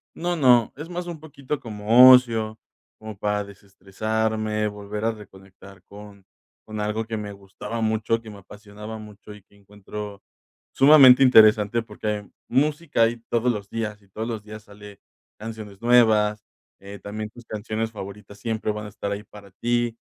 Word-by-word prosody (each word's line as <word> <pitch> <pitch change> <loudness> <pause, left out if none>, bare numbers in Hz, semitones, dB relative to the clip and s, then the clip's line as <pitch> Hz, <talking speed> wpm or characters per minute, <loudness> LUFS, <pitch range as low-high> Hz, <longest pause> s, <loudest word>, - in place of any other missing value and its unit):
No 175 +1 -2
no, 125 -7 +4
es 155 +3 -8
más 180 0 -5
un 170 -3 -7
poquito 145 -2 -6
como 115 +3 +6
ocio, 115 -4 +3 0.4
como 110 -2 -10
para 105 +1 -1
desestresarme, 105 +2 -3
volver 105 +1 -6
a 115 - +2
reconectar 95 -3 -15
con 100 0 -14 0.4
con 110 -1 -7
algo 105 +2 -2
que 110 0 -4
me 105 -1 -6
gustaba 100 +3 -7
mucho, 110 +1 0
que 110 - -12
me 105 - -11
apasionaba 105 +2 -10
mucho 105 -1 -12
y 105 - -14
que 100 - -28
encuentro 105 0 -9 0.5
sumamente 135 -2 +7
interesante 110 -2 +5
porque 105 -1 -8
hay 105 -1 -3 0.2
música 145 -1 +1
ahí 115 +1 0
todos 120 +1 +1
los 100 -3 -6
días 105 -2 -4
y 100 - -25
todos 110 +4 -5
los 110 -3 -5
días 110 0 -11
sale 105 -1 -14 0.4
canciones 110 -2 -9
nuevas, 110 -3 +3 0.3
eh, 100 +1 -11
también 105 +1 -6
tus 120 - -14
canciones 110 +1 -4
favoritas 100 0 -10
siempre 110 -1 -2
van 105 0 -6
a - - -9
estar 100 0 -5
ahí 100 +1 -4
para 100 -2 -15
ti, 120 +2 -1
110 Hz, 165 wpm, -23 LUFS, 105-115 Hz, 0.5 s, sumamente